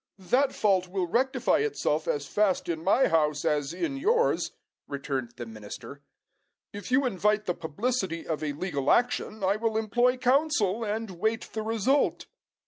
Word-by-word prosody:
"That 255 +9 +2
fault 190 -6 +2
will 185 0 -1
rectify 255 +9 +1
itself 160 - -1
as 145 -1 -1
fast 205 +2 +1
in 165 -2 -3
my 235 +8 +4
house 150 -2 +1
as 145 -1 +1
in 275 - -3
yours," 460 - +2 0.4
returned 135 -4 -4
the 120 - -5
minister. 110 -2 -9 0.7
"If 205 -2 -7
you 270 +2 +4
invite 210 -1 +1
the 180 - 0
publicity 175 - -2
of 155 -1 -3
a 150 -1 -1
legal 145 -3 -2
action, 230 -3 +1
I 195 +2 +2
will 220 0 0
employ 240 +4 +2
counsel, 250 -5 +2
and 220 0 -3
wait 220 +3 -1
the 220 - -2
result." 225 +6 +1
205 Hz, 155 wpm, -27 LUFS, 160-245 Hz, 0.7 s, my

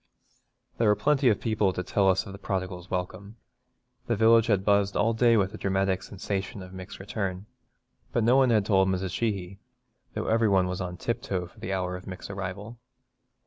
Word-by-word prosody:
There 115 - +3
were 105 - +5
plenty 135 +4 +3
of 105 - +2
people 105 -4 +1
to 90 - -3
tell 100 0 +2
us 95 - +2
of - - -8
the 100 - -10
prodigal's 95 -3 -4
welcome. 90 +3 -4 0.7
The 115 - +1
village 115 +1 +5
had 100 -4 +1
buzzed 100 -1 +2
all 115 +2 +2
day 115 0 +4
with 100 -2 +1
the 110 - -9
dramatic 95 -1 0
sensation 100 +1 -5
of 90 - -11
Mick's 95 -1 -9
return, 95 -1 -4 0.7
but 120 - +1
no 120 +3 +4
one 135 -1 +5
had 110 -4 +3
told 95 -3 +3
Mrs. 95 -1 -1
Sheehy 100 -3 -2 0.6
though - - -2
every 115 -1 +2
one 95 -2 +3
was 90 +1 -3
on 90 -1 -5
tiptoe 95 -5 -2
for 85 - -17
the 95 - -5
hour 90 -1 -1
of 90 - -10
Mick's 95 +1 -7
arrival. 100 +4 -6
100 Hz, 195 wpm, -27 LUFS, 95-110 Hz, 0.7 s, were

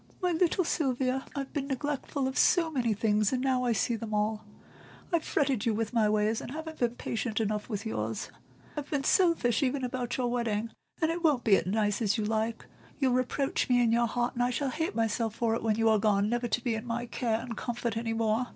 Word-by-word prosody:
My 360 -2 +1
little 350 +2 +2
Sylvia, 265 -5 0
I've 275 -1 -4
been 275 -2 -2
neglectful 280 0 -2
of 265 - -4
so 335 -3 +4
many 240 -7 0
things, 210 -1 +2
and 260 - 0
now 255 -1 +1
I 240 - +2
see 230 +2 +1
them 220 -1 -4
all; 215 +1 0 0.7
I've 335 -2 +2
fretted 270 -6 0
you 220 - +2
with 225 +1 -2
my 220 -3 +3
ways, 215 +1 +1
and - - -7
haven't 315 +3 -7
been 240 -1 +1
patient 225 -1 -2
enough 210 0 -1
with 210 -1 -4
yours; 110 - -3 0.4
I've 295 -1 -5
been 285 -2 -1
selfish 325 -9 +3
even 270 0 0
about 245 -1 -2
your 255 - 0
wedding, 230 -2 -1 0.3
and 315 - +3
it 340 +1 -4
won't 295 -7 +3
be 210 -4 +6
as 205 +3 +1
you 215 - -1
like 220 +1 -1
it; - - -17 0.3
you'll 265 -3 +2
reproach 255 +2 0
me 245 -1 +4
in 235 -2 +3
your 235 +1 +3
heart, 240 +2 -1
and 245 - -2
I 245 - +3
shall 260 +2 -1
hate 320 +8 -2
myself 225 0 0
for 230 -1 +1
it 230 - -1
when 220 -2 +1
you 225 +1 +2
are 220 -1 +4
gone 205 -1 +2
never 240 +1 0
to 240 - -1
be 230 -3 0
my 235 +1 -3
care 230 -2 -1
and 230 -1 -6
comfort 235 0 -3
any 225 0 -2
more. 225 +2 +1
240 Hz, 225 wpm, -29 LUFS, 220-265 Hz, 0.7 s, be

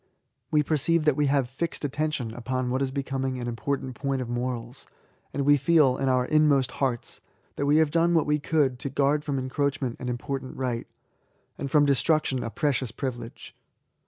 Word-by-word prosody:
We 150 -1 +3
perceive 155 +2 +1
that 150 -3 +4
we 145 0 +2
have 140 -2 +2
fixed 145 +4 -3
attention 145 -5 -2
upon 125 +1 -2
what 130 +2 0
is 135 - +1
becoming 135 -1 -2
an 120 -1 -4
import 130 +4 -2
ant 130 - -6
point 135 0 -2
of 125 -2 -4
Morals: 120 +1 -4 0.4
and 140 -1 -2
we 145 0 +6
feel, 150 -3 +4
in 135 -1 0
our 125 -1 +2
inmost 140 -3 +3
hearts, 130 -4 -2 0.3
that 140 - -1
we 145 +2 +5
have 160 -2 +3
done 170 +1 +3
what 160 - +3
we 150 0 +1
could 145 -4 +1
to 140 - -3
guard 140 +2 +1
from 145 -2 -2
encroachment 130 -1 -1
an 125 - -4
important 130 +2 -4
right, 125 -3 -2 0.7
and 140 - -3
from 145 +1 +4
destruction 140 -1 +2
a 115 - -3
precious 135 -2 -1
privilege. 120 -3 -6
135 Hz, 190 wpm, -26 LUFS, 125-145 Hz, 0.7 s, we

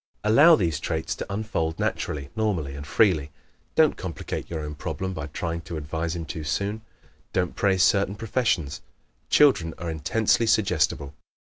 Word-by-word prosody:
Allow 145 +11 +7
these 85 - 0
traits 80 0 -2
to - - -6
unfold 100 -6 -2
naturally, 70 -2 -2
normally 95 -11 -1
and 70 +1 -8
freely. 80 -2 +3 0.5
Don't 160 -1 +4
complicate 90 -3 -5
your 80 -2 -3
own 75 0 -5
problem 95 +5 -4
by 80 -4 -5
trying 85 +2 -4
to 85 - -4
advise 80 +3 -3
him 85 -1 -4
too 80 0 -5
soon. 100 +8 -2 0.5
Don't 90 -2 0
praise 95 -2 +3
certain 100 0 +3
professions. 100 - -1 0.5
Children 105 - +4
are 85 -2 -4
intensely 110 +9 +1
suggestible. 80 - +1
85 Hz, 150 wpm, -25 LUFS, 75-105 Hz, 0.5 s, Allow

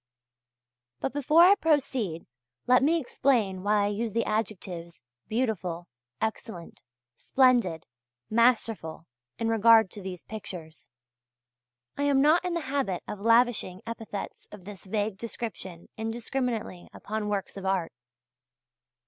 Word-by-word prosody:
But - - -2
before 295 +4 +5
I 370 +3 +8
proceed 265 - 0 0.4
let 250 0 +5
me 320 +5 +3
explain 235 - +1
why 205 +1 +2
I - - +2
use 215 +1 -2
the 230 - +1
adjectives 185 -6 -3 0.3
"beautiful, 190 -8 -2 0.3
excellent, 220 -5 -5 0.4
splendid, 240 - +2 0.4
masterful" 225 -8 +1 0.3
in 230 - -1
regard 225 -2 +5
to 205 - -9
these 185 -2 -7
pictures. 175 -8 -9 1.1
I 285 - +1
am 280 -1 +3
not 310 +5 +5
in 360 -1 -2
the 340 - -1
habit 265 - -2
of 210 - -6
lavishing 230 -4 +2
epithets 225 -3 -6
of 205 -4 -12
this 205 -3 -10
vague 205 0 -2
description 215 -7 -6
indiscriminately 225 -3 -3
upon 215 0 -4
works 200 -2 -3
of 195 -1 -5
art. 190 -4 0
220 Hz, 125 wpm, -28 LUFS, 190-250 Hz, 1.1 s, I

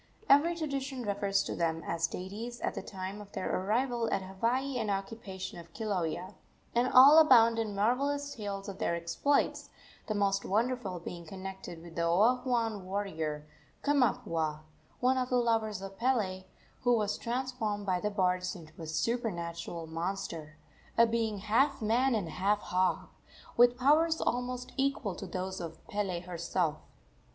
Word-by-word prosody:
Every 315 +5 +5
tradition 275 -5 -3
refers 200 -1 +1
to - - -4
them 165 -1 -1
as 165 0 0
deities 220 +6 -6
at - - -1
the - - -4
time 190 +1 -6
of 205 -1 -13
their - - -2
arrival 230 +4 0
at 195 - 0
Hawaii 240 +8 -1
and 215 -2 -1
occupation 195 -2 -4
of 170 -1 -13
Kilauea, 185 -3 -2 0.4
and 245 +2 +2
all 280 +5 +9
abound 230 -7 +6
in 215 -3 -2
marvellous 280 +7 +1
tales 200 -2 -5
of 195 0 -7
their 170 - +1
exploits, 170 +12 0 0.4
the 215 - -1
most 195 -1 +1
wonderful 215 -3 -1
being 170 0 -7
connected 190 -2 -8
with 170 -1 -11
the 170 - -1
Oahuan 225 +2 +2
warrior 160 -6 -3 0.4
Kamapuaa, 165 - +1 0.4
one 255 +1 +3
of 250 0 -1
the 250 - +1
lovers 225 -5 +1
of 195 0 -8
Pele, 210 -7 0 0.3
who 245 -1 +3
was 210 -1 0
transformed 235 -4 -2
by 185 -2 +1
the 210 - -1
bards 185 -2 0
into 160 -3 -12
a 160 - -6
supernatural 170 -4 -2
monster 165 -2 -4 0.4
a 230 - +8
being 225 -2 0
half 220 +8 +2
man 235 +4 +2
and 200 -6 -1
half 195 +6 +1
hog 185 -2 0 0.5
with 245 +1 +6
powers 315 +5 +4
almost 250 0 -2
equal 270 -7 0
to - - -7
those 185 0 -4
of 165 -1 -8
Pele 200 -6 -2
herself. 170 -2 -1
205 Hz, 155 wpm, -31 LUFS, 185-245 Hz, 0.5 s, all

